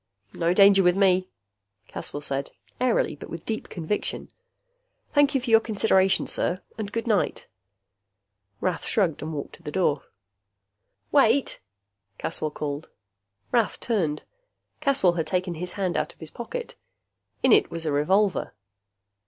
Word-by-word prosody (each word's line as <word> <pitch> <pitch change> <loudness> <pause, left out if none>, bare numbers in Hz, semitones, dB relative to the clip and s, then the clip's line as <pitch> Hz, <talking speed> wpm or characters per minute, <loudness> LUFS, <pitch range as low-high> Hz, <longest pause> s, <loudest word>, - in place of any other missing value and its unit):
"No 170 0 +1
danger 195 +1 +7
with 180 -1 +4
me," 185 -2 +3 0.6
Caswell 145 - -6
said, 140 -1 -3 0.3
airily 250 -10 +1
but - - -10
with 165 0 -7
deep 220 -1 -4
conviction. 170 +4 -3 0.8
"Thank 290 -1 +4
you 270 - +2
for 245 -2 -3
your 225 - +8
consideration, 195 -4 +2
sir. 180 +2 -2
And 215 -2 -5
good 230 +2 -2
night." 215 -5 0 1.2
Rath 180 -2 -1
shrugged 180 -9 0
and 155 - -4
walked 145 -3 -5
to - - -23
the - - -6
door. 150 -6 +1 1.1
"Wait!" 275 -1 +3 0.6
Caswell 155 - -3
called. 150 0 -5 0.6
Rath 235 -3 +1
turned. 170 -11 -1 0.6
Caswell 275 - +3
had 160 -2 -1
taken 180 +1 -1
his 175 +2 -5
hand 190 -3 -1
out - - -2
of - - -37
his 160 -2 -9
pocket. 475 - -6 0.7
In - - +5
it 425 - +5
was 165 -1 -5
a 155 - 0
revolver. 190 +8 +1
190 Hz, 145 wpm, -25 LUFS, 160-225 Hz, 1.2 s, your